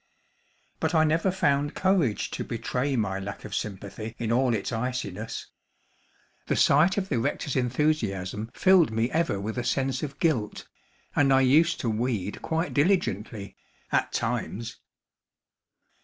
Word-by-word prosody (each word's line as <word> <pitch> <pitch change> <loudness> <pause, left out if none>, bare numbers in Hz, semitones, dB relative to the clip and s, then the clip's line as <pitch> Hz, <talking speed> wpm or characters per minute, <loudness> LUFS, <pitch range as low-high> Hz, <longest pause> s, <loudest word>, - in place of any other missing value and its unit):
But - - 0
I 160 - +5
never 165 +4 +2
found 145 -5 +1
courage 180 - +1
to - - -3
betray 125 +4 -2
my 100 -5 -1
lack 100 +1 -7
of - - -8
sympathy 105 +2 -5
in 115 -1 -2
all 125 0 +3
its 100 - -3
iciness. 125 -4 -3 1.0
The - - +1
sight 160 +8 +4
of 190 -1 -1
the 125 - +1
rector's 140 +2 -2
enthusiasm 115 -7 0
filled 185 -3 +5
me 115 +2 0
ever 160 -11 0
with 110 +4 -3
a - - -2
sense 135 +1 0
of 145 -2 -5
guilt, 135 -12 -1 0.5
and 140 -2 +4
I 135 0 +5
used 155 +6 +4
to 120 - -1
weed 110 -3 -2
quite 165 +2 -1
diligently, 115 - 0 0.4
at - - +1
times. 115 +2 -3
125 Hz, 140 wpm, -27 LUFS, 110-155 Hz, 1.0 s, I